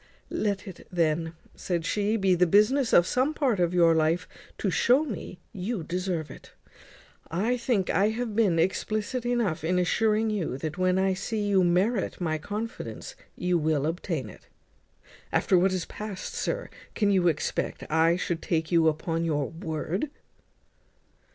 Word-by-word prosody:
"Let 205 Hz, 0 st, -1 dB
it 185 Hz, -, -10 dB
then," 165 Hz, -1 st, 0 dB, 0.2 s
said 170 Hz, -3 st, -2 dB
she, 210 Hz, +3 st, +1 dB
"be 195 Hz, -3 st, +3 dB
the 180 Hz, 0 st, +3 dB
business 220 Hz, -, +3 dB
of 175 Hz, -, +6 dB
some 260 Hz, +9 st, +1 dB
part 255 Hz, -10 st, +1 dB
of 175 Hz, -1 st, +2 dB
your 170 Hz, -2 st, +5 dB
life 160 Hz, +3 st, +1 dB, 0.3 s
to 195 Hz, -, -1 dB
shew 255 Hz, -, +3 dB
me 210 Hz, -7 st, -6 dB, 0.2 s
you 195 Hz, 0 st, -3 dB
deserve 175 Hz, -4 st, -3 dB
it. -, -, -13 dB, 0.8 s
I 210 Hz, +9 st, 0 dB
think 235 Hz, -6 st, 0 dB
I 200 Hz, +3 st, +3 dB
have 225 Hz, -1 st, -3 dB
been 205 Hz, -7 st, +3 dB
explicit 215 Hz, +7 st, -1 dB
enough 230 Hz, -11 st, 0 dB
in 180 Hz, +3 st, +1 dB
assuring 215 Hz, +4 st, +2 dB
you, 180 Hz, -11 st, -2 dB
that, 155 Hz, +2 st, -4 dB
when 185 Hz, 0 st, +2 dB
I 190 Hz, 0 st, +2 dB
see 205 Hz, +2 st, -2 dB
you 195 Hz, -2 st, +4 dB
merit 190 Hz, +5 st, +1 dB
my 160 Hz, -3 st, -1 dB
confidence, 215 Hz, +7 st, -6 dB, 0.2 s
you 180 Hz, -1 st, +1 dB
will 150 Hz, -2 st, +1 dB
obtain 165 Hz, -3 st, -2 dB
it. -, -, -14 dB, 0.8 s
After 190 Hz, -, +2 dB
what 185 Hz, +2 st, +4 dB
is 185 Hz, -2 st, -2 dB
past, 205 Hz, -3 st, -6 dB
sir, -, -, -3 dB, 0.2 s
can 205 Hz, -2 st, +2 dB
you 185 Hz, -3 st, +3 dB
expect 155 Hz, -3 st, -1 dB
I 160 Hz, +2 st, +3 dB
should 175 Hz, -2 st, -2 dB
take 160 Hz, -1 st, -1 dB
you 165 Hz, -2 st, +4 dB
upon 165 Hz, +1 st, 0 dB
your 150 Hz, -4 st, -1 dB
word?" 165 Hz, -, -3 dB
185 Hz, 160 wpm, -27 LUFS, 165-210 Hz, 0.8 s, of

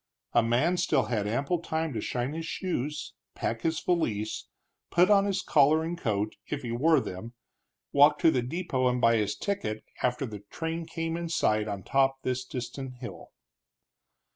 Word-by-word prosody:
A 120 Hz, -, +6 dB
man 125 Hz, +10 st, +2 dB
still 150 Hz, -6 st, +2 dB
had 105 Hz, -4 st, -1 dB
ample 140 Hz, +10 st, 0 dB
time 160 Hz, -2 st, -2 dB
to 110 Hz, -, -2 dB
shine 125 Hz, +5 st, -2 dB
his 165 Hz, +1 st, -4 dB
shoes, 150 Hz, -4 st, -3 dB, 0.2 s
pack 115 Hz, 0 st, -2 dB
his 160 Hz, +2 st, 0 dB
valise, 110 Hz, -, -1 dB, 0.4 s
put 180 Hz, +4 st, +4 dB
on 200 Hz, -1 st, +6 dB
his 195 Hz, -1 st, 0 dB
collar 155 Hz, +2 st, +4 dB
and 165 Hz, +2 st, -2 dB
coat 110 Hz, -, -1 dB
if 145 Hz, -1 st, -4 dB
he 120 Hz, -, -3 dB
wore 150 Hz, +6 st, +4 dB
them 110 Hz, 0 st, -6 dB, 0.6 s
walk 145 Hz, +1 st, +6 dB
to 165 Hz, -, +5 dB
the 125 Hz, -, +1 dB
depot 130 Hz, -1 st, -1 dB
and 125 Hz, 0 st, +1 dB
buy 115 Hz, -1 st, +4 dB
his 105 Hz, -2 st, 0 dB
ticket, 110 Hz, -, -3 dB, 0.2 s
after 125 Hz, +2 st, 0 dB
the 105 Hz, -4 st, -7 dB
train 165 Hz, 0 st, -4 dB
came 165 Hz, 0 st, -3 dB
in 170 Hz, 0 st, -3 dB
sight 110 Hz, -9 st, +1 dB
on 100 Hz, -3 st, -4 dB
top 135 Hz, +4 st, +3 dB
of 135 Hz, -, -43 dB
this 130 Hz, 0 st, -1 dB
distant 130 Hz, +1 st, -6 dB
hill. 125 Hz, -1 st, -9 dB
135 Hz, 180 wpm, -28 LUFS, 115-165 Hz, 0.6 s, A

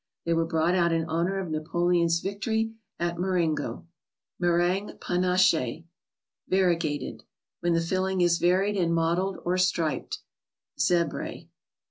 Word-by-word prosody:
They 170 Hz, -, +1 dB
were 165 Hz, 0 st, +1 dB
brought 165 Hz, +1 st, +1 dB
out 170 Hz, -2 st, +3 dB
in 165 Hz, -1 st, +1 dB
honor 170 Hz, +4 st, -1 dB
of 180 Hz, -4 st, -4 dB
Napoleon's 170 Hz, +2 st, +1 dB
victory 220 Hz, +3 st, -1 dB, 0.3 s
at 170 Hz, 0 st, -1 dB
Mar¬ 185 Hz, 0 st, +1 dB
engo. 150 Hz, -, -5 dB, 0.6 s
^crtttgite 175 Hz, +3 st, +1 dB
^anacljk 175 Hz, -6 st, +1 dB, 0.7 s
(a&arfegateti). 170 Hz, -6 st, +1 dB, 0.4 s
When 175 Hz, 0 st, +1 dB
the 165 Hz, -, +2 dB
filling 185 Hz, +2 st, 0 dB
is 175 Hz, -1 st, +3 dB
varied 190 Hz, +4 st, +2 dB
and 170 Hz, -2 st, +1 dB
mottled, 170 Hz, +4 st, 0 dB
or 180 Hz, +1 st, +1 dB
striped 185 Hz, -, 0 dB, 0.5 s
(z£br£). 170 Hz, -4 st, 0 dB
175 Hz, 125 wpm, -27 LUFS, 165-185 Hz, 0.7 s, out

